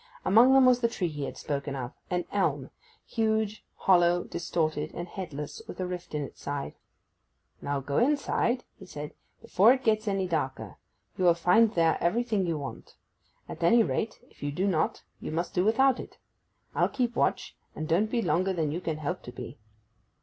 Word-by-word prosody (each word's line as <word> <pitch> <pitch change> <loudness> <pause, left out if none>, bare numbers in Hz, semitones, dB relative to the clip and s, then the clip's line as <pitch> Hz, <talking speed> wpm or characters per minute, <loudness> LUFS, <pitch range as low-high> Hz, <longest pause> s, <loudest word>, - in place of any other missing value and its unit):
Among 235 +7 +6
them 270 -1 +7
was 250 -1 +5
the 235 - +2
tree 190 -6 -2
he 145 -2 -4
had - - -7
spoken 140 -2 -3
of—an 140 +7 -4
elm; 145 -9 0 0.3
huge, 220 -2 -1
hollow, 175 -1 +3
distorted, 155 -2 -2
and 175 - -5
headless, 165 - -6
with - - -9
a 185 - -1
rift 180 -3 -6
in 150 - -1
its - - -10
side. 145 0 -4 0.9
'Now 140 -1 -2
go 140 +1 -1
inside,' 255 -2 +1 0.2
he 190 - -12
said, 150 -3 -7 0.3
'before 215 +7 +5
it 265 0 -4
gets 215 -1 +1
any 195 -2 0
darker. 150 -6 -3 0.4
You 185 - +2
will 170 -1 +6
find 180 +7 +4
there 165 -1 +3
everything 215 +1 +1
you 165 -2 -1
want. 140 -2 -8 0.5
At 160 - -8
any 230 +8 +5
rate, 220 0 -2
if - - -24
you 145 - -2
do 180 +7 -1
not 170 -5 0 0.2
you - - -6
must 170 +2 -2
do 180 - +2
without 255 +5 +3
it. - - -9 0.6
I'll - - +2
keep 245 -2 -1
watch; - - 0 0.2
and 155 - -4
don't 185 +7 +2
be 235 0 0
longer 185 +3 +1
than 160 -4 -1
you 170 +4 -3
can 160 -3 -2
help 165 +4 -3
to 125 - -9
be. 125 - -9
180 Hz, 185 wpm, -28 LUFS, 155-220 Hz, 0.9 s, them